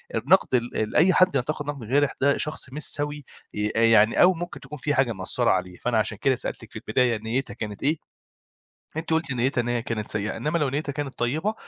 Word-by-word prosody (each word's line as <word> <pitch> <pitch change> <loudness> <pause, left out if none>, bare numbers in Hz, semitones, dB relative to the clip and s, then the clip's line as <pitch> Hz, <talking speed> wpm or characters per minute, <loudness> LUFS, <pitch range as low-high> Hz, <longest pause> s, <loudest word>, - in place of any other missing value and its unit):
النَقْد 135 - +3
ال 120 -3 -1
أي 185 +4 +5
حد 185 -5 +4
ينتقد 145 +3 -1
نَقْد 145 -4 -5
جارح 145 +3 +2
ده 140 +1 +3
شخص 150 -3 -3
مش 150 - -3
سَوي، 145 -1 0 0.3
ي 105 0 -1
آآ 115 - +2
يعني 110 -1 +5
أو 185 +1 +7
ممكن 175 +1 -6
تكون 150 +2 -9
في 145 +2 -1
حاجة 135 -3 +2
مأثّرة 110 +5 0
عليه. 90 -1 -2
فأنا 120 -2 -1
عشان 110 -1 0
كده 130 +4 +2
سألتِك 115 -2 -5
في - - -11
البداية 115 +1 +1
نيّتها 115 +5 -3
كانت 105 -2 -6
إيه، 150 +3 +2 1.0
أنتِ 165 +1 -4
قُلتِ 160 -3 0
نيّتها 125 +1 0
إن 120 - -3
هي 120 -1 0
كانت 115 -3 -3
سيئة، 105 +1 -2
إنّما 150 +9 -1
لو 150 - +1
نيّتها 145 +2 -2
كانت 145 -2 -5
طيبة 155 - 0
130 Hz, 215 wpm, -25 LUFS, 115-150 Hz, 1.0 s, أو